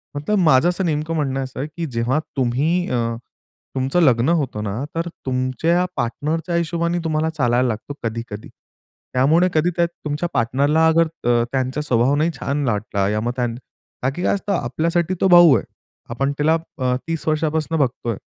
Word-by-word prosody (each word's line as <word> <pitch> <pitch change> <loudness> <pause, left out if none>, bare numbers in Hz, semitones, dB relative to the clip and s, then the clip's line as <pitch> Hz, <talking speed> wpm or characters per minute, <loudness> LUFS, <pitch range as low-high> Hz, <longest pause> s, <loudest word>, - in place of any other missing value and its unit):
मतलब 175 +9 0
माझं 160 -1 +5
असं 180 +1 -1
नेमकं 155 +1 -1
म्हणणं 135 -3 -1
असं 130 0 -8
आहे, 145 - -2
की 170 - -2
जेव्हा 125 +6 +1 0.2
तुम्ही 145 +9 +1
अ, 125 - 0 0.8
तुमचं 135 +6 +1
लग्न 130 -2 +4
होतं 140 -10 0
ना, 105 +6 -3
तर 165 +1 -1 0.2
तुमच्या 130 +7 +1
पार्टनरच्या 155 +8 -2
हिशोबाने 170 +1 0
तुम्हाला 160 0 0
चालायला 125 -5 +1
लागतं 120 +5 -4
कधी-कधी. 115 -2 -5 0.6
त्यामुळे 155 +8 +4
कधी 160 +3 +2
त्या 170 0 +3
तुमच्या 155 0 -4
पार्टनरला 140 +7 +2
अगर 165 0 +4 0.2
अ, 120 -1 +3
त्यांचा 130 +2 -1
स्वभाव 130 -1 +2
नाही 155 +3 +2
छान 140 +1 -1
वाटला, 105 -2 -1
या 105 0 0
मग 120 +1 -1
त्यांन 120 -2 -1 0.5
का 130 - +2
की 175 +6 -5
काय - - +2
असतं, 200 0 -2
आपल्यासाठी 170 0 0
तो - - +4
भाऊ 175 -6 +8
आहे. - - -4 0.5
आपण 135 +4 -1
त्याला 160 +2 +3 0.2
अ, 125 -1 +1
30 165 -1 -3
वर्षांपासून 155 +1 0
बघतो 125 -3 -1
आहे. 110 - -2
145 Hz, 175 wpm, -21 LUFS, 125-165 Hz, 0.8 s, भाऊ